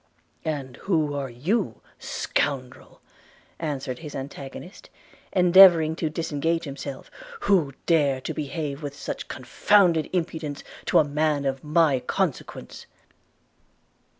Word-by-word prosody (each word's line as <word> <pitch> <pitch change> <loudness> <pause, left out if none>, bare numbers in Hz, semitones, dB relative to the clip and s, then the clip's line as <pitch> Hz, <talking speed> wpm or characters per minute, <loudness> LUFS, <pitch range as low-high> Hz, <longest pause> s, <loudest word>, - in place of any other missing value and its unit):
'And 140 -5 -4
who 160 -6 0
are 140 -2 -3
you, 145 - -1 0.2
scoundrel,' 130 -3 -3 0.6
answered 135 -5 -3
his 150 -3 -8
antagonist, 140 +6 -8 0.4
endeavouring 180 -3 +7
to 160 - -1
disengage 165 +1 -1
himself, 140 -1 -7 0.3
'who 170 - +2
dare 145 -6 +3
to - - -4
behave 150 -1 -4
with 145 -2 -5
such - - -5
confounded 165 +6 +2
impudence 160 -5 -3 0.2
to - - +3
a - - +7
man 150 0 0
of 135 -1 -2
my 150 -3 +3
consequence?' 160 +5 -3
150 Hz, 110 wpm, -25 LUFS, 140-165 Hz, 0.6 s, endeavouring